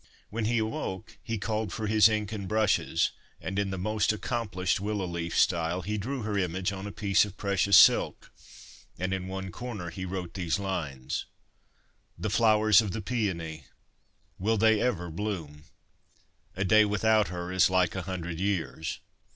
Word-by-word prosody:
When 110 +1 -2
he 120 +2 +1
awoke 110 -2 -3
he 115 -1 -3
called 110 0 -2
for 110 - -4
his 110 0 +6
ink 105 -1 -1
and 100 -3 -5
brushes, 100 -6 +1 0.3
and, 95 +5 -3
in 100 -1 0
the 95 - -3
most 110 +3 +1
accomplished 105 -5 -1
willow 100 -1 -2
leaf 85 -1 -3
style, 85 +1 +2
he 105 +4 -2
drew 130 +4 -3
her 105 -2 -1
image 90 +2 -1
on 95 +1 -6
a - - -6
piece 100 +2 +3
of 100 -1 -7
precious 100 -1 +3
silk, - - +5 0.7
and 95 +1 -2
in 95 -1 -3
one 95 0 -5
corner 105 -8 -6
he 95 - -6
wrote 90 -2 -5
these 90 -2 -1
lines: 80 -10 -3 0.9
The 110 - -3
flowers 110 -1 +5
of 105 -4 -4
the 110 - -3
paeony 85 -10 -3 0.7
Will 110 +4 +1
they 110 0 +4
ever 90 -9 -1
bloom? 80 -6 -5 0.9
A 95 - -1
day 110 +3 +6
without 105 +1 +2
her 90 0 -5
Is 95 0 +4
like 95 -2 +2
a 95 - -3
hundred 90 -3 -5
years. 90 -5 -2
100 Hz, 165 wpm, -28 LUFS, 90-110 Hz, 0.9 s, his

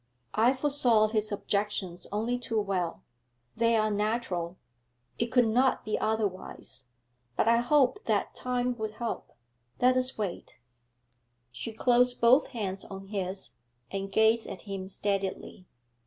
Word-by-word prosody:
I 235 +5 +4
foresaw 255 -6 +3
his 215 -1 0
objections 200 -3 -2
only 230 +4 -1
too 225 -2 -1
well; 190 -5 -2 0.5
they 230 0 +3
are 215 -1 +2
natural, 205 -5 -1 0.6
it 235 - +1
could 245 +1 +4
not 250 +4 +2
be 215 - -1
otherwise; 195 - -3 0.5
but - - +1
I 230 0 +5
hoped 270 - +2
that - - 0
time 250 0 -1
would 215 -1 -3
help. 235 -1 -4 0.5
Let 255 +1 +4
us 255 0 +1
wait!' 200 -5 -4 0.9
She 125 - -5
closed 245 +2 +3
both 245 +5 +5
hands 200 -7 -4
on 195 0 -9
his, 190 -2 -4 0.4
and 195 0 -4
gazed 220 +2 +3
at - - -8
him 195 -2 -5
steadily. 195 -2 -3
220 Hz, 135 wpm, -29 LUFS, 195-240 Hz, 0.9 s, I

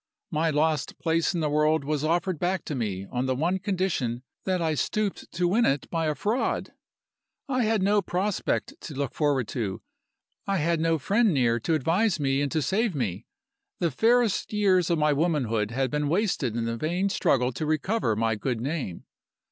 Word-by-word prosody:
My 160 0 +1
lost 155 0 0
place 165 +1 +1
in 170 - 0
the 150 - +1
world 150 0 +2
was 150 0 -1
offered 170 +1 0
back 180 0 -1
to - - -4
me 100 -7 -3
on 125 +1 -1
the 130 - +1
one 175 +7 0
condition 180 - -1 0.2
that 185 -1 +1
I 160 -2 +1
stooped 205 +6 -2
to 175 0 +1
win 215 +7 +3
it 140 -8 +1
by 165 -2 0
a 150 - 0
fraud. 215 - -1 0.8
I 255 -4 +1
had 215 -3 +1
no 205 +1 +3
prospect 190 +2 -1
to 150 - -8
look 140 -2 -2
forward 140 -6 +1
to; 105 -6 -3 0.6
I 195 0 +1
had 165 0 +1
no 165 0 +2
friend 205 - +2
near 120 -3 +2
to 160 +8 0
advise 170 - +1
me 135 -1 +1
and 140 -2 -1
to 155 - 0
save 205 - 0
me; 110 -5 -3 0.5
the 170 -2 0
fairest 230 - +2
years 190 -5 +3
of 170 - +2
my 150 -1 +3
womanhood 135 -9 0
had 130 +2 -1
been 150 -1 0
wasted 170 - 0
in 115 -1 -1
the 115 0 -2
vain 175 +8 0
struggle 130 - +2
to 140 +6 -4
recover 155 - 0
my 115 +1 +1
good 115 +2 -2
name. 130 - -4
155 Hz, 190 wpm, -26 LUFS, 130-185 Hz, 0.8 s, win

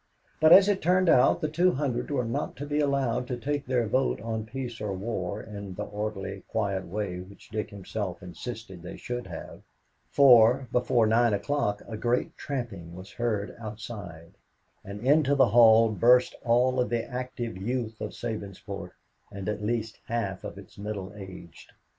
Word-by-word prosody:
But, 155 +1 +6
as 195 +2 +9
it 205 -2 +1
turned 180 +1 +3
out, 125 +6 +5
the 155 - +1
two 175 +4 +2
hundred 130 -4 -2
were 130 -4 0
not 115 - -3
to 145 - -6
be 145 +1 -1
allowed 135 -4 +1
to 125 - -3
take 145 +3 -3
their 125 -2 +1
vote 130 +5 +1
on 110 -1 -4
peace 120 -1 -6
or 105 -2 -2
war 100 -1 -3
in 100 -3 -8
the 105 - -3
orderly, 105 -2 -4
quiet 100 -4 -1
way 95 -1 -3
which 95 +2 -12
Dick 110 -1 -3
himself 100 -3 -5
insisted 95 0 -8
they 90 - -8
should 120 -2 -5
have, 85 -3 -8 0.5
for, 125 -1 +6
before 125 -2 +3
nine 115 0 +3
o'clock, 105 -1 -1
a 110 - -5
great 120 +3 0
tramping 105 - -5
was 95 +2 -10
heard 110 -4 -2
outside, 105 -7 -8 0.5
and 100 +1 -8
into 145 0 +4
the 135 - +5
hall 115 0 +7
burst 125 +5 +4
all 125 +2 +3
of 125 - +1
the 120 -1 -1
active 125 -3 -5
youth 115 +3 -3
of - - -5
Sabinsport 100 -4 -6 0.4
and 100 0 -6
at 105 -1 -2
least 110 0 -2
half 110 -5 -2
of - - -7
its - - -13
middle 100 -2 -5
aged. 95 -4 -11
115 Hz, 170 wpm, -28 LUFS, 100-125 Hz, 0.5 s, as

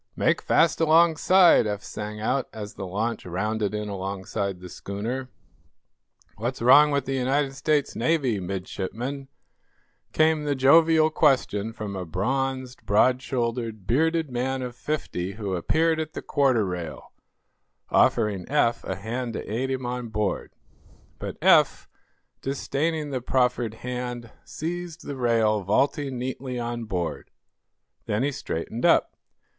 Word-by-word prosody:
"Make - - +2
fast 165 0 +3
alongside!" 165 - +5
Eph 105 -1 -3
sang 105 0 -6
out, 130 +4 -1
as 105 -1 -7
the 95 -2 -6
launch 110 +6 -2
rounded 105 +3 -2
in 105 0 -3
alongside 100 0 -4
the 90 - -9
schooner. 115 +9 -5 1.1
"What's 120 +5 -3
wrong 145 +5 +7
with 140 -2 0
the 135 - -2
United 135 +2 0
States 145 +1 0
Navy, 130 -4 +1
Midshipman?" 100 +9 -5 0.8
came 155 -1 +3
the 145 -1 0
jovial 160 +4 +5
question 130 -9 +2
from 105 -3 -6
a 95 - -3
bronzed, 130 - -2
broad 125 +5 +3
shouldered, 115 -5 -3
bearded 160 +4 +1
man 130 +2 -1
of 125 -1 -6
fifty 110 -10 -3
who 105 -3 -4
appeared 160 - +1
at 155 0 -4
the - - -6
quarter 130 -7 +2
rail, 90 -3 -6 0.8
offering 105 -5 +2
Eph 135 -5 +2
a 95 - -3
hand 115 +5 -4
to - - -5
aid 125 +5 -2
him 130 -1 -2
on 125 -1 -3
board. 105 -2 -2 0.7
But - - -6
Eph, - - +4 0.5
disdaining 145 +3 -2
the 130 -2 -2
proffered 125 -3 0
hand, 125 -2 -4
seized 170 +1 -5
the 140 - -5
rail, 115 -4 +2
vaulting 135 - 0
neatly 130 0 -4
on 120 -1 -3
board. 90 -5 -4 0.8
Then 105 +4 0
he 145 - +1
straightened 115 -1 -5
up. - - +4
125 Hz, 135 wpm, -25 LUFS, 105-140 Hz, 1.1 s, wrong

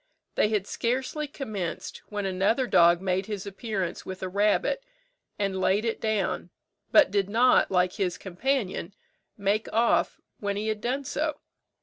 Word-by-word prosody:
They 210 - +2
had 210 -3 0
scarcely 260 +8 -2
commenced 215 - -5
when 205 -1 -3
another 195 +7 +1
dog 170 -5 +5
made 190 0 0
his 205 -3 -4
appearance 200 -3 -3
with 185 0 -7
a 185 - -2
rabbit, 210 - +1 0.5
and 195 -2 -1
laid 200 +4 +2
it 230 - -2
down, 215 -3 -1 0.4
but 305 -10 +6
did 200 -1 +1
not, 240 +4 +4
like 180 -1 +2
his 180 -3 -1
companion, 195 -2 -2 0.4
make 205 +1 0
off 230 +2 +2 0.2
when 200 -1 -2
he 215 +1 -1
had 215 -1 -2
done 260 +5 -1
so. 305 +2 -1
205 Hz, 150 wpm, -27 LUFS, 190-235 Hz, 0.5 s, but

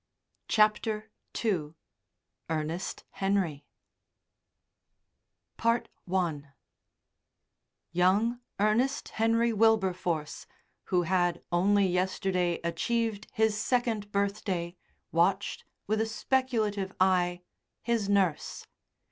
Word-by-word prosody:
CHAPTER 215 0 +2 0.3
II 165 -8 0 0.7
ERNEST 160 +3 -3
HENRY 195 -7 -1 1.9
I 230 +1 +2 2.1
Young 200 +8 +2 0.2
Ernest 235 +7 +1
Henry 230 +1 +2
Wilberforce, 185 -8 +1 0.4
who 180 -2 +1
had 175 -1 +1
only 195 +3 +3
yesterday 180 -1 0
achieved 215 +5 -1
his 220 -1 +2
second 220 -2 0
birthday, 200 -4 -1 0.4
watched, 190 +4 +1 0.2
with 215 +1 +1
a 225 - 0
speculative 220 -5 0
eye, 180 -1 +2 0.4
his 230 -4 0
nurse. 190 -6 0
200 Hz, 75 wpm, -29 LUFS, 180-220 Hz, 2.1 s, only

